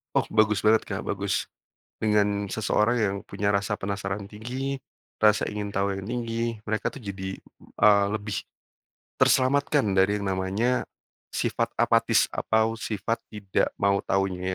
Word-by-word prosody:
Oh - - +4
bagus 105 -2 +3
banget, 110 +1 +5
Kak - - -4
bagus. - - -2 0.5
Dengan 105 -2 +2
seseorang 110 +2 +1
yang 100 -3 +1
punya 100 0 -1
rasa 100 +1 0
penasaran 100 0 -3
tinggi, 125 +6 -4 0.4
rasa 105 -1 +5
ingin 105 0 -4
tahu 100 0 0
yang 95 - -7
tinggi, 115 0 -2
mereka 110 -1 -1
tuh 140 - -10
jadi, 95 -2 -5 0.4
eee, 100 -1 +6
lebih 105 -2 -3 0.8
terselamatkan 140 +2 +3
dari 100 +2 +3
yang 100 - -2
namanya 100 +7 0 0.5
sifat - - -1
apatis - - +3
atau 110 +1 +1
sifat 115 0 -2 0.2
tidak 100 -3 -1
mau 100 0 +3
tahunya 95 -1 0
105 Hz, 135 wpm, -26 LUFS, 100-110 Hz, 0.8 s, eee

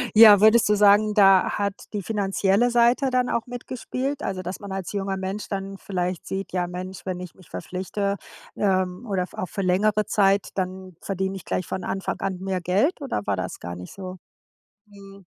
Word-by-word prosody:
Ja, 210 -2 +10
würdest 220 +1 +6
du 210 - +4
sagen, 210 +1 +5
da 195 -3 +6
hat 200 -1 0 0.2
die 205 - -3
finanzielle 200 +2 +1
Seite 240 +3 +3
dann 250 -1 +1
auch 235 - -1
mitgespielt? 255 +3 -4
Also, 185 -1 -3
dass 180 +2 -5
man 200 -1 -8
als 190 0 -4
junger 195 -1 -2
Mensch 190 +2 -4
dann 195 0 -4
vielleicht 180 -2 -3
sieht: 195 0 -4
„Ja, 180 -1 0
Mensch, 180 +2 -7
wenn 180 -1 -3
ich 180 -2 -8
mich 185 -4 -19
verpflichte, 200 +2 -3 0.4
ähm, 185 +2 0
oder 190 -3 -1
v - - -17
auch 185 - -3
für 205 -2 -4
längere 205 +3 +2
Zeit, 200 -1 +2
dann 185 -1 -4
verdiene 190 0 -3
ich 190 - -9
gleich 180 - -2
von 185 - -4
Anfang 195 - -3
an 190 -2 -2
mehr 190 -1 -2
Geld?“, 200 - +1
oder 270 - -3
war 100 - +1
das 95 0 -5
gar 85 +1 -6
nicht 90 0 -9
so? 185 -1 -7 0.7
Mhm. 200 -1 -14
195 Hz, 195 wpm, -24 LUFS, 185-210 Hz, 0.7 s, Ja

